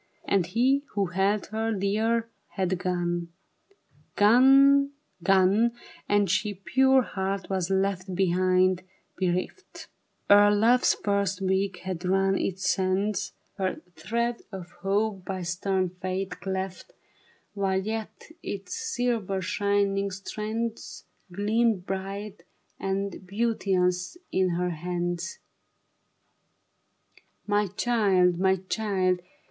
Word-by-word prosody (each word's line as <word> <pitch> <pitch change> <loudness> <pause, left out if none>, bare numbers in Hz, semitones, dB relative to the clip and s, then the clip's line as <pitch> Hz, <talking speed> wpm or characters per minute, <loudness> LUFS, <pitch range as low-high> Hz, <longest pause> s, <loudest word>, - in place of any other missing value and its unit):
And 190 -4 +1
he 255 +8 +2
who 200 -1 +2
held 195 +3 +1
her 220 +1 -1
dear 220 +3 0 0.3
had 185 -2 0
gone. 175 -1 -1 0.9
Gone, 275 +6 +6 0.3
gone, 195 +5 +3 0.4
and 205 -1 +3
she, 205 +3 0
pure 265 +6 +3
heart, 195 -2 -3
was 185 -2 -1
left 190 -1 -1
Behind, 185 0 +2 0.3
bereft 185 - -3 0.4
Ere 205 0 +7
love's 225 +4 +4
first 200 -1 -1
week 190 -1 -1
had 185 -2 -4
run 195 +1 +2
its 190 0 -2
sands; 195 +2 0 0.3
Her 190 -1 -1 0.2
thread 235 +8 -2
of 185 -3 -8
hope 200 0 0
by 185 -1 -4
stern 185 +1 -1
fate, 185 +1 -3
cleft 190 - -4 0.6
While 190 -1 0
yet 220 +1 -5 0.2
its 195 -1 -6
silver 245 - -1
shining 200 +1 0
strands 215 +4 -5 0.3
Gleamed 210 0 +1
bright 195 +2 -5 0.4
and 195 0 -3
beauteous 190 - 0
in 185 -2 +1
her 180 +1 -1
hands. 175 +1 -3 2.1
My 205 0 +1
child, 195 -4 +2
my 190 0 +3
child 190 -5 0
195 Hz, 105 wpm, -27 LUFS, 185-215 Hz, 2.1 s, Ere